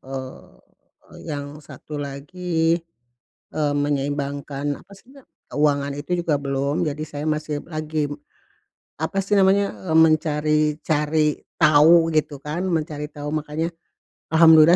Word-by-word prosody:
Eee, 130 - -8 0.7
yang 145 0 -5
satu 150 0 -8
lagi, 165 +4 -1 0.8
eee, 150 -2 +1
menyeimbangkan, 145 0 -2
apa 200 - -17
sih 195 +3 -16
na 275 - -15 0.2
keuangan 145 -1 +1
itu 175 +5 -2
juga 165 -4 +1
belum. 140 +1 -1
Jadi 155 0 -2
saya 145 -1 -6
masih 150 -1 -2
lagi, 155 -2 -3 0.9
apa 175 +5 -2
sih 205 - -1
namanya, 200 0 +4 0.2
eee, 160 - +4
mencari-cari 150 0 +1 0.2
tahu, 160 +2 +6
gitu 150 -2 0
kan, 150 +5 -4
mencari 150 -3 -2
tahu. 145 0 -6
Makanya, 155 +2 -2 0.5
Alhamdulillah 160 0 +7
150 Hz, 120 wpm, -23 LUFS, 145-160 Hz, 0.9 s, Alhamdulillah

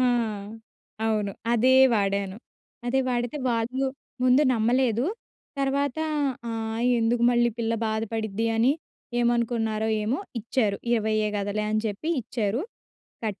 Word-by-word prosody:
ఆ! - - +4 1.0
అవును. 210 -3 0 0.2
అదే 250 +3 +4 0.2
వాడాను. 200 -1 0 0.5
అదే 265 +2 +2
వాడితే 240 +3 -1
వాళ్ళు, 240 +4 0 0.4
ముందు 255 +3 +5
నమ్మలేదు. 240 +1 +2 0.5
తర్వాత 275 +1 0 0.5
ఆహ్, 225 +1 -2 0.2
"ఎందుకు 235 +1 +1
మళ్ళీ 240 0 +3
పిల్ల 230 0 0
బాధపడిద్ది 220 0 -2
అని, 240 +5 +4 0.5
ఏమనుకున్నారో 230 -2 +1 0.2
ఏమో" 250 - 0 0.2
ఇచ్చారు. 215 -3 0 0.2
ఇరవైయే 215 -2 +1
కదాలే 205 +1 -1
అని 215 0 +1
చెప్పి 215 +10 -4
ఇచ్చారు. 225 +1 -1 0.6
కట్ 210 -3 -3
225 Hz, 110 wpm, -26 LUFS, 215-245 Hz, 1.0 s, ముందు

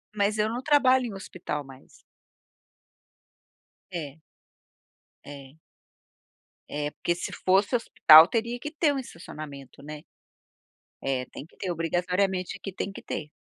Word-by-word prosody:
Mas 205 +1 +1
eu 215 +1 +1
não 240 +2 -3
trabalho 260 -3 +4
em 225 - -5
hospital 180 -6 -5
mais. 135 -1 -16 1.9
É 155 -2 -6 1.0
É. 140 -1 -11 1.1
É, 145 0 -3
porque 170 - -2
se 175 - -5
fosse 195 +6 +3
hospital 160 -8 +8
teria 235 +3 -2
que 300 - -6
ter 305 -1 +2
um 275 - -2
estacionamento, 150 - -10
né. 150 0 -8 1.0
É 130 -2 -1
tem 140 - -10
que - - -26
ter, 185 - -3
obrigatoriamente, 180 +3 -1
aqui 195 0 -7
tem 190 +1 -4
que - - -10
ter. 150 - -5
180 Hz, 130 wpm, -27 LUFS, 150-215 Hz, 1.9 s, hospital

